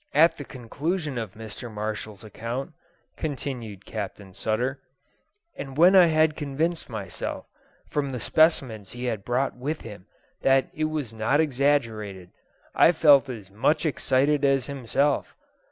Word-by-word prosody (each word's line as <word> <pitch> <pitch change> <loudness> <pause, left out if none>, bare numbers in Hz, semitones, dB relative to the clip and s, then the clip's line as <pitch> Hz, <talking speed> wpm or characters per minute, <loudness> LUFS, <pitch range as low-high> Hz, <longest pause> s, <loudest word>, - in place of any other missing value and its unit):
"At 165 +3 +5
the 145 - -6
conclusion 145 +4 -3
of 110 -4 -5
Mr. 110 +2 -8
Marshall's 105 0 -5
account," 115 - -5 0.5
continued 125 -9 -5
Captain 100 -2 -6
Sutter, 120 +8 -1 0.7
"and 135 -1 -7
when 180 +4 +7
I 180 -2 +8
had 155 -1 +3
convinced 155 +3 -2
myself, 100 -6 -5 0.4
from 145 -2 -1
the 125 -2 -4
specimens 120 - +2
he 120 +1 -7
had 110 -5 -2
brought 125 +4 0
with 145 +6 -4
him, 105 -5 -10 0.3
that 135 0 +3
it 155 - -1
was 150 -7 -3
not 115 +6 +1
exaggerated, 115 - 0 0.4
I 170 - +6
felt 145 -4 +6
as 105 -6 -8
much 130 - +1
excited 145 0 +2
as 135 -2 +3
himself. 140 +1 0
130 Hz, 135 wpm, -26 LUFS, 110-150 Hz, 0.7 s, I